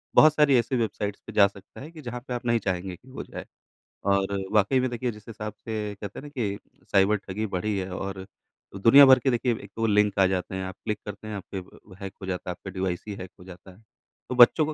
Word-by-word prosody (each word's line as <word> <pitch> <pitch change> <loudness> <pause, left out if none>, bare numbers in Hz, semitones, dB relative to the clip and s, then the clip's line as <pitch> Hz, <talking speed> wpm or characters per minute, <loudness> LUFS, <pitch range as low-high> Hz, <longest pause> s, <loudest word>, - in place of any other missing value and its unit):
बहुत 155 -1 +8
सारी 150 -3 +4
ऐसी 120 +2 0
वेबसाइट्स 105 -3 -2
पे - - -6
जा 100 -2 +6
सकता 100 +4 -14
है 155 - -9
कि 160 -2 -11
जहाँ 125 -2 -5
पर 125 - -3
आप 120 0 -4
नहीं 115 -1 +3
चाहेंगे 95 -2 -3
कि 125 +9 -20
वो 130 - -6
जाए। - - -8 0.7
और 100 0 +1 0.2
वाक़ई 105 +5 +4
में 130 0 +1
देखिए 120 +1 -2
जिस 105 -1 -14
हिसाब 105 -1 -6
से 105 -2 -3
कहते 100 -1 -6
हैं - - -10
न - - -8
कि 110 -8 -2 0.3
साइबर 100 +2 +4
ठगी 105 +3 -2
बढ़ी 105 +2 -1
है 95 -1 -3
और 95 0 -5 0.5
दुनिया 115 +8 +8
भर 130 -1 +8
के 130 - +1
देखिए 120 0 +1
एक 100 - -12
तो 115 - 0
लिंक 105 -2 +3
आ 95 - +6
जाते 95 0 -2
हैं 95 - -3
आप 95 - -6
क्लिक 105 - -2
करते 105 +1 -8
हैं 110 - -4
आप 100 - -6
के - - -1 0.5
हैक 95 - -6
हो - - -5
जाता 90 -1 -4
है, - - 0
आपके 95 +2 -8
डिवाइस 95 -2 -2
ही 105 - -4
हैक 95 -1 -8
हो 90 - -12
जाता 95 +1 -12
है। 100 +5 -20 0.5
तो 125 - -2
बच्चों 125 +5 +7
को 155 - -3
105 Hz, 255 wpm, -26 LUFS, 95-120 Hz, 0.7 s, बहुत